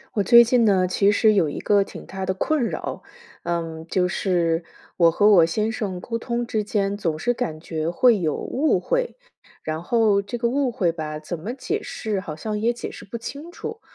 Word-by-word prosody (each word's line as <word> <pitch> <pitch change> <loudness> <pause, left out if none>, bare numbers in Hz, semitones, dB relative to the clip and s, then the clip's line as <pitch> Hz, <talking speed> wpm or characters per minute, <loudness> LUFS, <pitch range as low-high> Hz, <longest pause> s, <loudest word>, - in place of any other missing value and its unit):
我 205 - +2
最 235 +3 +8
近 240 0 +3
呢， 190 -4 +3
其 195 +2 +3
实 215 +1 +4
有 175 -7 +2
一 - - -5
个 205 -1 +3
挺 - - -11
大 190 0 -6
的 190 0 -1
困 300 +8 0
扰。 - - -4 0.4
嗯， 165 -2 -3
就 180 +1 +1
是 175 -3 0 0.3
我 170 -2 +5
和 205 +5 +3
我 195 -5 +7
先 210 +7 0
生 205 -6 -4
沟 230 +5 -4
通 240 +1 -2
之 220 -2 -1
间， 200 -1 -1
总 165 -6 -2
是 245 +8 0
感 165 -11 -3
觉 160 -1 -3
会 225 +5 +4
有 155 -4 0
误 295 +4 0
会， - - -1 0.5
然 155 +1 -3
后 210 +1 +2
这 205 +5 -5
个 235 0 0
误 270 0 0
会 180 -7 +1
吧， 155 -2 -5
怎 155 +2 -6
么 205 +9 -5
解 260 - -3
释 215 -3 -3
好 165 -5 -6
像 210 +6 -4
也 230 +3 +2
解 240 - -6
释 - - -11
不 220 +4 -6
清 285 +8 -8
楚。 450 +5 -7
200 Hz, 230 characters per minute, -23 LUFS, 170-235 Hz, 0.5 s, 最